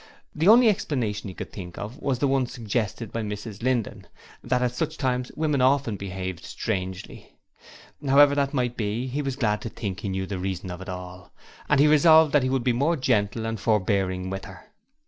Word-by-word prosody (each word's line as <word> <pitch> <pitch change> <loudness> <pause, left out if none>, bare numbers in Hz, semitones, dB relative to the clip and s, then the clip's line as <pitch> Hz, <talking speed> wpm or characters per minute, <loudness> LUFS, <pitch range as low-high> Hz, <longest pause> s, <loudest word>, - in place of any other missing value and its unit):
The 160 +4 0
only 235 +3 +8
explanation 120 - -1
he 95 - -8
could - - -7
think 90 -3 -8
of 110 +4 -7
was 135 -3 -1
the 140 - +1
one 135 -2 +1
suggested 115 -1 -3
by 115 - -3
Mrs 105 0 -6
Linden 120 -3 -1 0.4
that 125 0 +1
at 125 -1 0
such 155 +4 -3
times 125 -2 -1
women 150 -4 0
often 130 -4 +2
behaved 95 -2 -5
strangely. 95 -3 -5 0.7
However 140 +1 +6
that 140 -1 +1
might 125 -3 -1
be, 110 +3 -2
he 135 +3 -2
was 135 -2 -3
glad 105 -5 0
to 115 - -5
think 100 -4 -5
he 100 - -4
knew 95 0 -2
the 95 -1 -5
reason 95 0 -4
of 90 0 -7
it 95 - -8
all, 90 -1 -8 0.4
and 150 - +4
he 145 - +6
resolved 155 0 +6
that 145 - +5
he 130 - 0
would 130 -2 0
be 125 -1 +2
more 145 +8 +1
gentle 115 -4 0
and 115 -1 -3
forebearing 95 -3 0
with 95 0 -5
her. 95 0 -13
115 Hz, 205 wpm, -25 LUFS, 95-135 Hz, 0.7 s, only